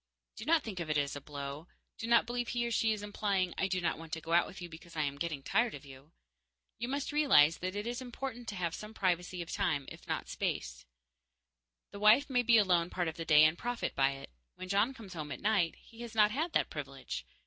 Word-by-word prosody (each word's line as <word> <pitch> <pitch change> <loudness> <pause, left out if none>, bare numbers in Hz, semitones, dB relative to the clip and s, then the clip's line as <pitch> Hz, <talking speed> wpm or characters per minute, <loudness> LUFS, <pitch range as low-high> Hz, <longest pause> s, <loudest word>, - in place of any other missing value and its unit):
Do - - -8
not 325 -1 +3
think 200 -5 -5
of 165 -2 -4
it 155 - +2
as 145 -1 0
a 145 - -6
blow; 140 +2 -7 0.3
do 225 - -4
not 235 0 +5
believe 240 +1 -2
he 240 0 -1
or 235 - -2
she 225 -1 +2
is 210 -1 -2
implying 200 -3 0
"I 190 - 0
do 185 -1 0
not 160 -3 -1
want 165 -1 -10
to 165 - -1
go 165 +1 -4
out 175 - +5
with - - -10
you 175 - -6
because 165 0 -13
I 155 - +1
am 140 -1 -3
getting 155 -4 -3
tired 225 - +1
of - - -11
you." 135 +2 -14 0.7
You 235 - -2
must 280 +3 -2
realize 260 - +5
that 185 +2 -3
it 205 +1 -3
is 240 +2 -3
important 245 -1 -6
to 210 - -4
have 170 -3 -2
some 215 +3 -8
privacy 180 -1 0
of 170 - -10
time, 145 -3 0
if - - -12
not - - -1
of - - -18
space. - - -3 1.0
The 200 - -8
wife 220 +7 +5
may 250 -1 +3
be 235 -1 +5
alone 180 -5 +3
part 175 -2 -1
of 160 - -7
the 165 - -5
day 155 -1 +7
and 155 +1 +5
profit 240 +6 -3
by 135 0 +2
it. 135 - -10 0.2
When 185 - -8
John 205 +7 +2
comes 205 -6 -10
home 155 -4 -6
at - - -5
night, 200 -6 +2
he 230 +1 -14
has 235 -1 -7
not 210 -1 +5
had 320 +8 -2
that - - +1
privilege. - - -5
185 Hz, 255 wpm, -32 LUFS, 160-230 Hz, 1.0 s, day